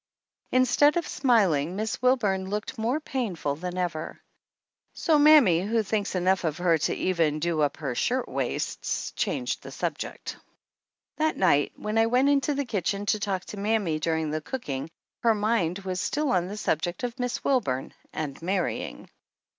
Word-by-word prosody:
Instead 255 +5 +4
of 340 - 0
smil 230 - +3
ing 165 +6 -4
Miss 215 +3 -3
Wilburn 205 -7 +2
looked 210 +1 -3
more 235 +7 0
painful 205 - -2
than 180 +3 -5
ever; 170 -3 -3 0.7
so 310 -2 +2
mammy, 290 - +7
who 220 +3 +1
thinks 205 -1 -2
enough 185 +1 +2
of 160 -2 -1
her 175 -2 +3
to - - 0
even 165 -5 +1
do 160 0 0
up 145 - +1
her 140 -5 -3
shirtwaists, 250 - -2
changed - - -1
the - - -9
subject. - - -4 0.8
That 315 0 +1
night 145 -6 +3
when 215 +1 -1
I 225 - +4
went 255 +4 +3
into 285 +1 +2
the 285 0 -1
kitchen 200 -2 -2
to 215 +1 +1
talk 195 -2 -2
to 210 - -8
mammy 200 -6 0
during 160 -1 -1
the 155 0 -2
cooking 150 - -4 0.3
her 230 -2 +4
mind 205 -5 +1
was 185 -1 -2
still 295 -2 0
on 180 -1 +1
the 205 +3 -6
subject 175 -1 -1
of 245 +1 -4
Miss 245 -1 -2
Wilburn 135 - 0 0.2
and 150 -2 -5
marry 185 0 -1
ing. - - -8
200 Hz, 170 wpm, -26 LUFS, 165-245 Hz, 0.8 s, mammy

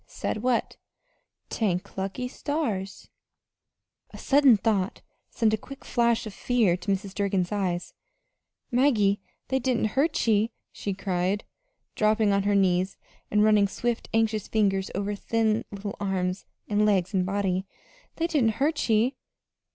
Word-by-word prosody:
"Said - - -3
what?" 245 -1 0 0.7
"'T'ank 185 -5 -1
lucky 195 +6 -3
stars.'" 250 -9 -3 1.0
A - - -11
sudden 275 -5 +5
thought 200 -2 -1 0.3
sent 220 -3 +1
a - - +2
quick 275 +5 -12
flash 235 -2 +1
of 215 - -7
fear 230 -8 +2
to 180 +2 -3
Mrs. 195 0 -2
Durgin's 195 -3 0
eyes. 185 -4 -2 0.8
"Maggie, 220 -6 +3 0.3
they 265 - +1
didn't 245 -3 0
hurt 300 +3 +1
ye," 220 0 +2 0.2
she 200 -2 -4
cried, 190 +1 -1 0.5
dropping 215 -1 +2
on 200 - +2
her 205 - +3
knees 185 -1 +2 0.3
and 210 0 +3
running 210 -2 +5
swift, 235 +4 -3
anxious 220 -2 +1
fingers 195 -3 +1
over 200 +1 -1
the 200 - -9
thin 225 -1 +1
little 200 0 -6
arms 190 -2 -2 0.2
and 210 0 +2
legs 200 -2 +2
and 185 -2 +2
body. 190 0 -1 0.5
"They 330 - -1
didn't 275 -10 +2
hurt 295 -1 0
ye!" 230 +5 +2
210 Hz, 145 wpm, -26 LUFS, 195-235 Hz, 1.0 s, sudden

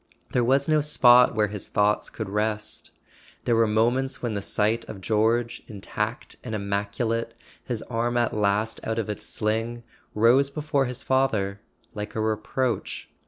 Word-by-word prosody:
There 125 - +2
was 135 +3 +2
no 155 -1 +3
spot 125 -5 +6
where 105 -1 +2
his 105 -1 -5
thoughts 105 +1 +1
could 110 - -5
rest: 105 +1 -2 0.6
there 120 - +3
were 115 0 +4
moments 120 +5 +1
when 120 -3 -1
the 100 - -2
sight 110 +3 +1
of 100 - -7
George, 115 +4 +1
intact 105 +1 -4
and 110 -3 -4
immaculate—his 100 - -3
arm 120 +1 -1
at 120 -1 +1
last 105 +1 0
out 110 0 -2
of 110 -2 -1
its 105 - -6
sling 115 +2 -2 0.3
—rose 120 +6 +4
before 145 -1 0
his 125 +1 -5
father 110 -7 +1 0.3
like 105 0 -6
a - - -1
reproach. 110 +2 -2
110 Hz, 155 wpm, -25 LUFS, 105-120 Hz, 0.6 s, spot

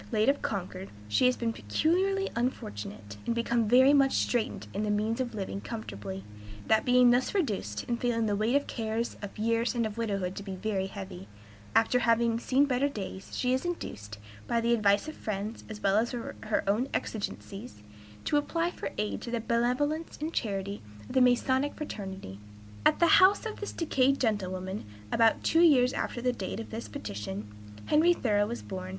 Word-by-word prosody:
late 220 +1 +3
of 280 - +1
Concord, 190 -1 -4 0.2
she 105 - +3
has 250 - +2
been 230 -1 -1
peculiarly 365 - +1
unfortunate, 105 - -4
and 235 - +1
become 235 -1 +1
very 260 +5 +6
much 275 -2 +4
straitened 235 -3 0
in 200 - -2
the 215 - -1
means 215 +4 0
of 240 -3 -3
living 190 - -4
comfortably; 100 -2 -6 0.4
that 220 0 +3
being 250 -1 +6
thus 250 +9 +1
reduced, 205 - -1
and 235 -1 -2
feeling 230 -2 +1
the 205 -1 +1
weight 220 +5 +1
of 285 - +3
cares, 225 0 -2
of 205 -1 -7
years, 230 +3 +1
and 235 -1 +1
of 215 +1 -5
widowhood 195 -5 -1
to - - -5
be 195 -1 -6
very 190 0 -1
heavy, 95 - -8 0.5
after 225 +2 +4
having 230 -1 +2
seen 270 +4 +3
better 275 +1 +1
days, 195 -5 -7
she 250 0 +1
is 260 - 0
induced, 110 - -5 0.3
by 235 - +1
the 235 +1 +2
advice 205 +2 +3
of 310 - -6
friends, 210 +1 -4
as 215 -1 -7
well 195 0 +3
as 230 +2 +2
her 230 -3 -3
own 220 +7 +1
exigencies, 200 - -5 0.4
to 295 - +2
apply 330 +4 0
for - - -5
aid 210 0 -2
to 240 - -6
the 235 0 -1
benevolence 250 +8 0
and 315 +2 -3
charity 200 -2 -2 0.2
of 105 - -10
the 260 - +4
Masonic 260 +3 +3
fraternity." 190 - -6 0.5
At - - +3
the 340 - +6
house 375 +6 +6
of 445 - -5
this 415 - -4
decayed 275 -4 +2
gentlewoman, 190 -4 -1 0.3
about 225 -1 +3
two 325 - +4
years 265 -6 +5
after 240 - -3
the 250 -1 +2
date 200 -1 -4
of 225 - -7
this 225 +1 -5
petition, 105 - -6 0.3
Henry 325 +4 +5
Thoreau 205 -6 +1
was 235 +2 -5
born. 185 -1 -6
230 Hz, 185 wpm, -29 LUFS, 195-255 Hz, 0.5 s, very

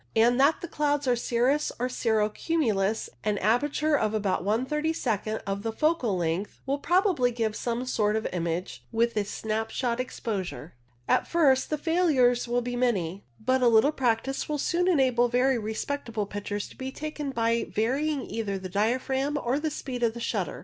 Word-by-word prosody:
and 240 +3 +4
that 280 +4 +4
the 345 - -5
clouds 290 -3 0
are 250 - +4
cirrus 245 +5 +1
or 250 - 0
cirro 220 -4 +1
cumulus, 220 - 0 0.2
an 210 -1 0
aperture 290 +9 +2
of 215 -6 0
about 200 -4 0
one 220 +6 +1
thirty 300 +3 0
second 220 -7 -1
of 195 0 -2
the 225 +1 -2
focal 260 - +1
length 170 +4 -2
will 275 +1 -1
probably 355 - +2
give 225 -3 -2
some 240 +1 -2
sort 215 -4 +1
of 220 - -1
image 170 0 -3
with 235 0 +1
a 210 - +1
snap 220 +2 -3
shot 245 -2 -1
exposure. 200 -9 -4 0.3
At - - +2
first 275 -6 +3
the 305 - 0
failures 290 -8 +2
will 240 0 0
be 245 0 -3
many, 200 -7 0
but 255 +4 +1
a 245 - +5
little 235 +5 +5
practice 260 0 -1
will 300 - 0
soon 350 +5 +1
enable 260 -8 +3
very 250 +1 +2
respectable 220 0 -3
pictures 205 0 -4
to - - -15
be 260 0 -5
taken 300 0 -5
by 230 -2 0
varying 275 +6 0
either 210 -3 -3
the 185 -1 -7
diaphragm 260 +8 0
or 260 0 0
the 315 +1 -1
speed 260 -4 -5
of 235 0 0
shutter. - - -2
245 Hz, 180 wpm, -27 LUFS, 215-280 Hz, 0.3 s, a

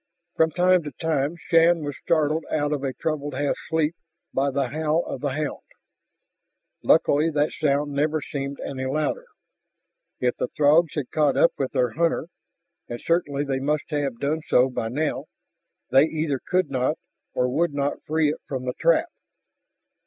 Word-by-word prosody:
From 160 - +3
time 180 +2 +3
to 150 -2 -7
time 155 -1 0
Shann 165 -1 +3
was 145 -1 -4
startled 155 0 +1
out 145 -1 0
of 145 -2 -2
a 135 - -1
troubled 145 -1 -3
half 145 +1 0
sleep 160 0 +1 0.4
by 140 +1 +1
the 135 -2 -1
howl 155 +3 0
of - - -5
the 145 - 0
hound. 150 0 -3 1.2
Luckily 150 +3 +4
that 150 -1 +1
sound 145 -1 0
never 150 +2 +1
seemed 140 -1 -5
any 130 -1 -4
louder. 155 - -1 0.9
If 125 -1 0
the - - -1
Throgs 150 +3 +3
had 145 -5 -3
caught 150 -3 +2
up 170 - +5
with 135 -2 -2
their 125 -2 +1
hunter, 165 +6 0 0.6
and 120 0 -5
certainly 145 -4 0
they 135 -2 -1
must 150 +3 -1
have 140 -5 -1
done 155 +3 -1
so 130 +1 +4
by 115 -2 -2
now, 150 +6 -2 0.7
they 135 +3 +6
either 155 -4 -2
could 185 0 +1
not, 130 +4 0 0.4
or 125 - +2
would 150 +3 0
not 140 0 -1
free 155 -1 +2
it - - -7
from 130 -2 -4
the 125 - -2
trap. 170 - +3
145 Hz, 165 wpm, -24 LUFS, 140-160 Hz, 1.2 s, they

